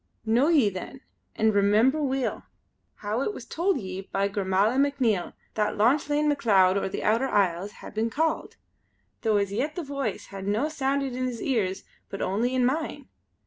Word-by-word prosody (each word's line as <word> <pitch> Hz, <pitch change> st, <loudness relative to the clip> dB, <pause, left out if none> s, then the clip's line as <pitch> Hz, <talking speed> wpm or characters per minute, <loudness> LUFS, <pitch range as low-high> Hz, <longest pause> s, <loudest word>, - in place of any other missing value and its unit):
Know 235 Hz, +6 st, +3 dB
ye 285 Hz, -11 st, +4 dB
then, 185 Hz, +8 st, -8 dB, 0.3 s
and 220 Hz, 0 st, +2 dB
remember 215 Hz, +9 st, +3 dB
weel, 270 Hz, -2 st, -1 dB, 0.5 s
how 215 Hz, +4 st, -2 dB
it 415 Hz, +9 st, -2 dB
was -, -, -8 dB
told 350 Hz, -2 st, 0 dB
ye 190 Hz, -2 st, -5 dB
by 195 Hz, 0 st, +1 dB
Gormala 200 Hz, +4 st, +1 dB
MacNiel 260 Hz, -10 st, +1 dB, 0.2 s
that 210 Hz, -1 st, 0 dB
Lauchlane 290 Hz, +6 st, +2 dB
Macleod 200 Hz, -10 st, +4 dB
o' 200 Hz, -, 0 dB
the -, -, -4 dB
Outer 230 Hz, +5 st, +2 dB
Isles 190 Hz, 0 st, +1 dB
hae -, -, -11 dB
been 220 Hz, +2 st, -1 dB
Called; 320 Hz, +6 st, -1 dB, 0.7 s
tho' 220 Hz, -2 st, +2 dB
as 200 Hz, -1 st, 0 dB
yet 285 Hz, +8 st, -1 dB
the 350 Hz, -, -3 dB
Voice 275 Hz, -7 st, -3 dB
has 195 Hz, 0 st, -6 dB
no 220 Hz, +9 st, +1 dB
sounded 275 Hz, -3 st, -1 dB
in 255 Hz, 0 st, -1 dB
his 240 Hz, -2 st, -5 dB
ears 200 Hz, -8 st, 0 dB, 0.3 s
but 195 Hz, -, -6 dB
only 235 Hz, +7 st, 0 dB
in 250 Hz, -1 st, +3 dB
mine. 290 Hz, 0 st, -2 dB
230 Hz, 175 wpm, -26 LUFS, 200-275 Hz, 0.7 s, ye